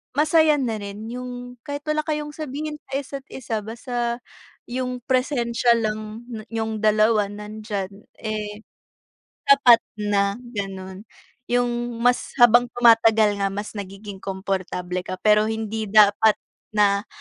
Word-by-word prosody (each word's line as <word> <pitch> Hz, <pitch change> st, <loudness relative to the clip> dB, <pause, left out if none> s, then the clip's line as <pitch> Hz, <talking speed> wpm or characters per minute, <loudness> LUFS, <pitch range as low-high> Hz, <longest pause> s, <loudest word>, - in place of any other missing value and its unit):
Masaya 310 Hz, 0 st, +4 dB
na 235 Hz, -4 st, -1 dB
rin, 205 Hz, +1 st, -7 dB
yung 245 Hz, 0 st, -7 dB
kahit 285 Hz, +1 st, -6 dB
wala 305 Hz, 0 st, +1 dB
kayong 300 Hz, -1 st, -3 dB
sabihin 300 Hz, 0 st, -5 dB
sa -, -, -23 dB
isa't 275 Hz, -1 st, -7 dB
isa 225 Hz, -5 st, -4 dB
basta 235 Hz, +1 st, -3 dB, 0.5 s
yung 250 Hz, 0 st, -3 dB
presensiya 245 Hz, -3 st, +1 dB
lang 215 Hz, +2 st, -4 dB, 0.2 s
niyong 220 Hz, -1 st, -3 dB
dalawa 215 Hz, -1 st, +3 dB
nandiyan 210 Hz, -1 st, -6 dB
eh, 210 Hz, -1 st, -4 dB, 0.9 s
sapat 275 Hz, -4 st, +7 dB, 0.2 s
na 200 Hz, -1 st, +1 dB, 0.2 s
ganun. 195 Hz, -1 st, -6 dB, 0.4 s
Yung 240 Hz, -1 st, -1 dB
mas 245 Hz, 0 st, +1 dB
habang 240 Hz, +1 st, +7 dB
tumatagal 225 Hz, -3 st, +5 dB
nga 195 Hz, -, +1 dB
mas 205 Hz, +1 st, -4 dB
nagiging 195 Hz, 0 st, -8 dB
komportable 190 Hz, -2 st, -3 dB
ka. 185 Hz, -, -3 dB
Pero 210 Hz, 0 st, +5 dB
hindi 220 Hz, 0 st, -3 dB
dapat 210 Hz, +1 st, +5 dB, 0.4 s
na 200 Hz, 0 st, +3 dB
220 Hz, 120 wpm, -23 LUFS, 205-245 Hz, 0.9 s, sapat